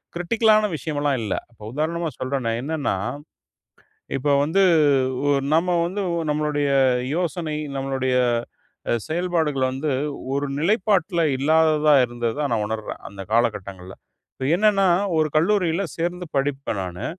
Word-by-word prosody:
கிரிட்டிக்கலான 215 Hz, +4 st, +3 dB
விஷயம்லாம் 145 Hz, -3 st, -1 dB
இல்ல. 105 Hz, -, -2 dB, 0.2 s
இப்ப 110 Hz, -, -16 dB
உதாரணமா 160 Hz, +3 st, -1 dB
சொல்றேனே. 130 Hz, -3 st, -1 dB
என்னன்னா, 145 Hz, -8 st, -1 dB, 1.2 s
இப்ப 140 Hz, +3 st, -2 dB, 0.2 s
வந்து 180 Hz, +6 st, +2 dB, 0.6 s
ஓ -, -, +3 dB, 0.2 s
நம்ம 165 Hz, +3 st, +2 dB, 0.2 s
வந்து 195 Hz, +4 st, -3 dB, 0.3 s
நம்மளுடைய 150 Hz, -1 st, 0 dB, 0.5 s
யோசனை, 170 Hz, -3 st, -2 dB, 0.2 s
நம்மளுடைய 135 Hz, -1 st, -1 dB, 0.7 s
அ -, -, +2 dB, 0.2 s
செயல்பாடுகள் 160 Hz, -5 st, 0 dB
வந்து 140 Hz, +3 st, -2 dB, 0.4 s
ஒரு 140 Hz, +1 st, -1 dB
நிலைப்பாட்டுல 190 Hz, 0 st, +1 dB, 0.2 s
இல்லாததா 155 Hz, +1 st, +3 dB
இருந்ததா 120 Hz, +3 st, -3 dB
நான் 110 Hz, -2 st, +1 dB
உணர்றேன், 110 Hz, 0 st, -5 dB
அந்த 100 Hz, 0 st, -11 dB
காலகட்டங்கள்ல. 100 Hz, -5 st, -1 dB, 0.4 s
இப்ப 130 Hz, -, -4 dB
என்னன்னா, 205 Hz, -1 st, +3 dB, 0.3 s
ஒரு 155 Hz, -1 st, +2 dB
கல்லூரியில 175 Hz, +1 st, +2 dB
சேர்ந்து 175 Hz, +2 st, -2 dB
படிப்பேன் 135 Hz, -5 st, -1 dB
நானு. 90 Hz, -1 st, -5 dB
150 Hz, 115 wpm, -23 LUFS, 130-170 Hz, 1.2 s, கிரிட்டிக்கலான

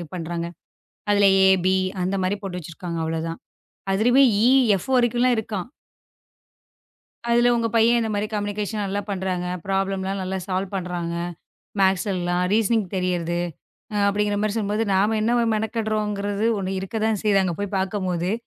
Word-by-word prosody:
பண்றாங்க. 170 Hz, 0 st, -3 dB, 0.7 s
அதுல 205 Hz, -1 st, +5 dB, 0.2 s
ஏ, -, -, +6 dB, 0.2 s
பி 185 Hz, -, +4 dB, 0.3 s
அந்த 185 Hz, +2 st, -1 dB
மாதிரி 190 Hz, +3 st, 0 dB
போட்டு 185 Hz, -2 st, -4 dB
வச்சிருக்காங்க. 170 Hz, +1 st, -6 dB
அவ்ளோ 160 Hz, 0 st, -2 dB
தான். 165 Hz, -, -5 dB, 0.6 s
அதுவே 245 Hz, +7 st, +4 dB, 0.2 s
ஈ, -, -, +5 dB, 0.3 s
எஃப் 190 Hz, -, -6 dB
வரைக்கும் 240 Hz, -1 st, +2 dB
எல்லாம் 250 Hz, -2 st, +3 dB
இருக்காம். 210 Hz, -4 st, -3 dB, 1.6 s
அதுல 240 Hz, +1 st, +4 dB
உங்க 230 Hz, -1 st, +1 dB
பையன் 235 Hz, +1 st, +4 dB
இந்த 225 Hz, -1 st, -1 dB
மாதிரி 205 Hz, +1 st, -1 dB
கம்மியூனிகேஷன் 205 Hz, 0 st, -2 dB
நல்லா 200 Hz, +1 st, -2 dB
பண்றாங்க. 185 Hz, -2 st, -2 dB, 0.2 s
ப்ராப்ளம் 195 Hz, 0 st, -1 dB
எல்லாம் 195 Hz, +1 st, -2 dB
நல்லா 190 Hz, +1 st, -3 dB
சால்வ் 190 Hz, +1 st, -2 dB
பண்றாங்க. 175 Hz, -2 st, -3 dB, 0.7 s
மேத்ஸ்ல 190 Hz, +1 st, +2 dB
எல்லாம் 175 Hz, 0 st, 0 dB
ரீசனிங் 220 Hz, -2 st, +2 dB
தெரியுது 175 Hz, -2 st, -1 dB, 0.7 s
அப்படிங்கற 205 Hz, 0 st, +1 dB
மாதிரி 215 Hz, 0 st, -1 dB
சொல்லும் 210 Hz, -2 st, -1 dB
போது. 220 Hz, +1 st, +1 dB
நாம 205 Hz, +4 st, +2 dB
என்ன 230 Hz, +2 st, +1 dB, 0.2 s
மெனக்கெடுறோங்கிறது 215 Hz, -2 st, -1 dB
ஒண்ணு 190 Hz, 0 st, -3 dB
இருக்கத்தான் 215 Hz, +2 st, -1 dB
செய்யுது 200 Hz, -2 st, +3 dB
அங்க 180 Hz, -2 st, -1 dB
போய்ப் 205 Hz, 0 st, -3 dB
பார்க்கும்போதே 190 Hz, -1 st, -1 dB
200 Hz, 150 wpm, -23 LUFS, 185-215 Hz, 1.6 s, ஏ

